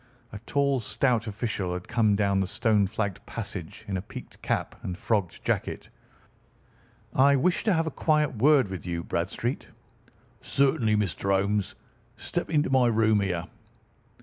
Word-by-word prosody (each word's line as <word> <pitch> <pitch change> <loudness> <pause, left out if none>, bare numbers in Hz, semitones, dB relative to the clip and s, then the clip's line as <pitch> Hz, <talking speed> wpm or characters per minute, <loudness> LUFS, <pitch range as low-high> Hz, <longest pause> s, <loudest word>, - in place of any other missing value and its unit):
A 105 - -6
tall, 140 -2 +2
stout 120 0 0
official 100 -3 -2
had 90 0 -6
come 110 -4 +2
down 100 -1 +2
the 95 - 0
stone 105 -2 +2
flagged 100 -1 -3
passage, - - -7
in 95 -2 -2
a - - -3
peaked - - -11
cap - - -1
and 90 - -5
frogged 100 -4 -1
jacket. - - -2 1.2
"I 140 +2 +5
wish 170 +7 +1
to 210 - +4
have 165 -1 +1
a 160 - -2
quiet 150 -4 +1
word 135 0 +5
with 95 -2 -6
you, 85 -1 -2
Bradstreet." - - -2 0.7
"Certainly, 130 -6 +2
Mr. 100 -1 -1
Holmes. 100 +1 +1 0.4
Step - - -3
into 150 -4 +1
my 130 -2 +4
room 110 -2 +3
here." 90 -4 -1
110 Hz, 150 wpm, -27 LUFS, 100-135 Hz, 1.2 s, I